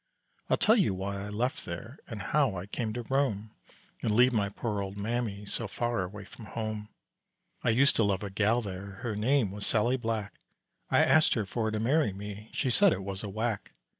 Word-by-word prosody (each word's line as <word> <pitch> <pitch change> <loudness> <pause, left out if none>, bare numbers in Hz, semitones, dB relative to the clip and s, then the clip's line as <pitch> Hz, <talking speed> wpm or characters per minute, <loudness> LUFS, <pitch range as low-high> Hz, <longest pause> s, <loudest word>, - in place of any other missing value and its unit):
I'll - - +4
tell 220 +3 +5
you 170 - +3
why 100 +1 -3
I 100 - -5
left 125 +9 -1
there 110 - -7
And 110 -5 -6
how 135 -3 +2
I 90 0 -4
came 110 +2 -3
to 120 +1 -4
roam, 115 -5 0 0.5
And - - +1
leave 125 +2 +6
my 100 -3 +1
poor 105 0 -2
old 100 +1 -5
mammy, 105 -1 -2
So 110 +2 -3
far 120 0 -1
away 100 +2 -7
from 110 - -12
home. 110 -1 -4 0.7
I - - +2
used 135 +5 +4
to 115 - +4
love 100 -1 +1
a 100 - -4
gal 110 +4 +2
there, 100 0 -6
Her 115 -4 -2
name 115 0 +2
was 100 0 -3
Sallie 120 +4 +2
Black, 115 -4 -2 0.6
I - - +5
asked 155 0 +5
her 110 -4 0
for 110 +3 -1
to 110 0 -2
marry 130 0 +2
me, 105 +2 -7
She 130 - 0
said 200 - +6
it 95 - -4
was 95 0 -4
a 105 - -4
whack. 110 +1 -2
110 Hz, 210 wpm, -30 LUFS, 100-120 Hz, 0.7 s, leave